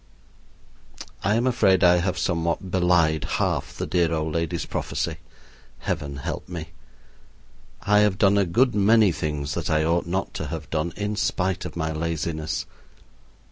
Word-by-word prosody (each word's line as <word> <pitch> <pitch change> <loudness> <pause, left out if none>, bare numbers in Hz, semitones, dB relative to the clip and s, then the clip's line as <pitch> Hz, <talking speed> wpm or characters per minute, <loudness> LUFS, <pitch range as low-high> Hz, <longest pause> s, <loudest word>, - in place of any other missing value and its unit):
I 105 - +2
am 120 +2 +1
afraid 105 -7 +3
I 90 0 +6
have 90 +1 -1
somewhat 85 +1 -1
belied 85 -4 +3
half - - -1
the - - -2
dear 85 -2 +1
old 80 -1 -1
lady's 85 -1 -1
prophecy. - - -3 0.6
Heaven 70 -3 -3
help 70 - -5
me! 85 -3 -6 1.1
I 105 0 +4
have 105 -2 +3
done 100 0 +4
a 100 - +3
good 120 +9 +3
many 105 0 +5
things 75 -2 -3
that - - -3
I 80 0 +2
ought 85 +2 +1
not 95 +2 -2
to - - -4
have - - -6
done, 80 +2 -1
in 105 +1 -2
spite 95 -1 -1
of - - -6
my 80 -1 -2
laziness. 80 0 -2
85 Hz, 155 wpm, -24 LUFS, 80-95 Hz, 1.1 s, I